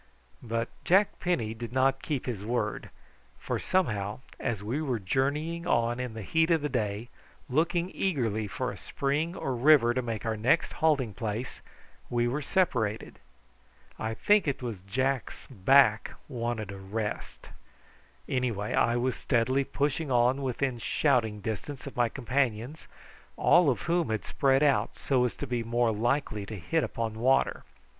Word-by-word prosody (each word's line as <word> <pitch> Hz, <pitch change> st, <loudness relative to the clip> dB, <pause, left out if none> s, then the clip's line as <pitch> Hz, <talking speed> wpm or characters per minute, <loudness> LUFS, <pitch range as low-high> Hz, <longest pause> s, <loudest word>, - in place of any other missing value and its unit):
But 115 Hz, 0 st, -2 dB
Jack 195 Hz, +3 st, +3 dB
Penny 120 Hz, -12 st, 0 dB
did 115 Hz, +1 st, -7 dB
not 135 Hz, +1 st, +2 dB
keep 145 Hz, -5 st, -3 dB
his 115 Hz, -6 st, -4 dB
word, 110 Hz, -1 st, -2 dB, 0.5 s
for -, -, -3 dB
somehow 105 Hz, -, 0 dB, 0.2 s
as 115 Hz, -5 st, -2 dB
we 125 Hz, +9 st, -2 dB
were 130 Hz, -6 st, -1 dB
journeying 150 Hz, -, -1 dB
on 120 Hz, -4 st, +1 dB
in 125 Hz, -3 st, -4 dB
the 110 Hz, -, -6 dB
heat 160 Hz, -, +2 dB
of 165 Hz, -3 st, +2 dB
the 150 Hz, -, 0 dB
day 110 Hz, -2 st, -2 dB, 0.4 s
looking 170 Hz, +6 st, +1 dB
eagerly 115 Hz, -, -1 dB
for -, -, -3 dB
a -, -, -9 dB
spring 150 Hz, +5 st, -2 dB
or 135 Hz, -7 st, -2 dB
river 125 Hz, -2 st, +5 dB
to 130 Hz, -, 0 dB
make 115 Hz, -3 st, -4 dB
our 110 Hz, -1 st, 0 dB
next 120 Hz, +10 st, +2 dB
halting 140 Hz, -9 st, +1 dB
place 115 Hz, +2 st, -4 dB, 0.5 s
we 120 Hz, 0 st, +1 dB
were 135 Hz, +5 st, -1 dB
separated. 125 Hz, -, 0 dB, 0.8 s
I 110 Hz, 0 st, -2 dB
think 210 Hz, -, +3 dB
it 135 Hz, -2 st, -2 dB
was 115 Hz, -6 st, -4 dB
Jack's 130 Hz, +6 st, -2 dB
back 110 Hz, 0 st, +4 dB
wanted 115 Hz, -4 st, -3 dB
a 100 Hz, -, -8 dB
rest. 105 Hz, +2 st, -5 dB, 0.8 s
Anyhow 125 Hz, -5 st, -1 dB, 0.2 s
I 120 Hz, +1 st, +3 dB
was 125 Hz, +1 st, 0 dB
steadily 130 Hz, +2 st, +1 dB
pushing 145 Hz, +3 st, -1 dB
on 125 Hz, +2 st, +3 dB
within 130 Hz, -1 st, -1 dB
shouting 115 Hz, -5 st, +1 dB
distance 110 Hz, +7 st, -5 dB
of 140 Hz, -, -8 dB
my 120 Hz, -1 st, +2 dB
companions, 130 Hz, +1 st, -2 dB, 0.5 s
all 175 Hz, -5 st, +5 dB
of 125 Hz, -, 0 dB
whom 170 Hz, -3 st, +1 dB
had 110 Hz, -1 st, -2 dB
spread 135 Hz, +1 st, +2 dB
out 140 Hz, -3 st, +2 dB
so 130 Hz, -3 st, +1 dB
as 125 Hz, -, -2 dB
to -, -, -4 dB
be 120 Hz, -2 st, -2 dB
more 120 Hz, 0 st, +1 dB
likely 110 Hz, -2 st, -1 dB
to 110 Hz, -, -6 dB
hit 155 Hz, -, 0 dB
upon 110 Hz, -1 st, -3 dB
water. 130 Hz, +3 st, +2 dB
125 Hz, 160 wpm, -29 LUFS, 110-140 Hz, 0.8 s, river